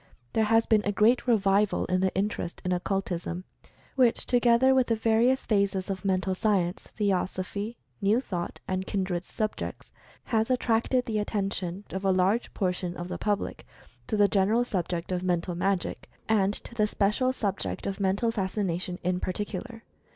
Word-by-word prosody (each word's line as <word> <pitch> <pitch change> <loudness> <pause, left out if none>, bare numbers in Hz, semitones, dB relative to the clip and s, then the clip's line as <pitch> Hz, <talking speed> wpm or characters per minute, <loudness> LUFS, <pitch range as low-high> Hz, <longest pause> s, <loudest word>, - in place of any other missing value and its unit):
There 220 - +3
has 225 +1 +4
been 220 -2 +4
a 205 - 0
great 225 +5 +3
revival 205 -3 +3
in 185 0 +1
the 190 0 +2
in 200 +2 +3
terest 175 -4 -5
in 180 - 0
Occultism, 180 -1 -2 0.5
which 250 -4 +3
together 245 +1 +4
with 260 -2 +3
the 230 - +2
various 230 +4 +2
phases 200 -2 +1
of 190 0 -5
Mental 190 -1 +1
Science, 185 -3 0
Theosophy, 200 +2 -1 0.2
New 205 +4 +3
Thought, 180 -9 -4
and 185 0 -2
kindred 185 -3 -1
subjects, 215 -1 -4 0.3
has 225 0 0
attracted 250 0 +1
the 220 -3 -1
attention 195 -3 -2
of 190 +1 -4
a 195 - +2
large 190 +5 +2
portion 180 -2 -1
of 175 +1 -5
the - - -4
public 205 -1 -2 0.4
to 215 - -1
the 205 -1 +6
general 205 +4 +2
subject 180 -6 -3
of 180 -1 0
Mental 180 -1 0
Magic, 185 +1 -1 0.2
and 205 -3 +3
to 210 - -7
the 215 -2 +2
special 210 +6 +1
subject 205 -6 -3
of 195 0 -3
Mental 200 +4 +1
Fascination, 190 -4 -2
in 180 0 0
particular. 210 +5 -4
200 Hz, 165 wpm, -28 LUFS, 185-225 Hz, 0.5 s, the